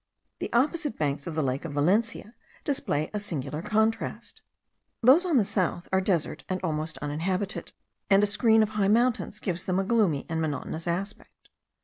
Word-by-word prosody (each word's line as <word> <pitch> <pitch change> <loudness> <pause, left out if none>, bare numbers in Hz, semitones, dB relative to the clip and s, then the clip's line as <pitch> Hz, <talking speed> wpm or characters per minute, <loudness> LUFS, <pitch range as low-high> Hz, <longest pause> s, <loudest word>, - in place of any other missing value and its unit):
The - - -4
opposite 295 +3 +1
banks 145 0 -1
of 165 - -4
the 155 - +1
lake 130 0 -1
of 165 -4 -5
Valencia 210 +9 +1 0.3
display 210 - -1
a 210 - -1
singular 150 -6 -4
contrast; 220 +3 -1 0.6
those 295 +10 +6
on 325 -6 +3
the 225 - +5
south 185 -3 -1
are 190 - +4
desert, 180 -5 -1
and 185 0 -1
almost 155 -2 -2
uninhabited, 185 +7 -2 0.4
and 195 +1 +5
a - - +6
screen 220 +2 +4
of 215 - -1
high 210 -2 0
mountains 230 -1 +2
gives 180 -4 -3
them 185 -1 0
a 195 - +2
gloomy 195 -9 +2
and 160 0 -2
monotonous 155 +2 -3
aspect. 195 +5 -5
190 Hz, 170 wpm, -27 LUFS, 160-220 Hz, 0.6 s, those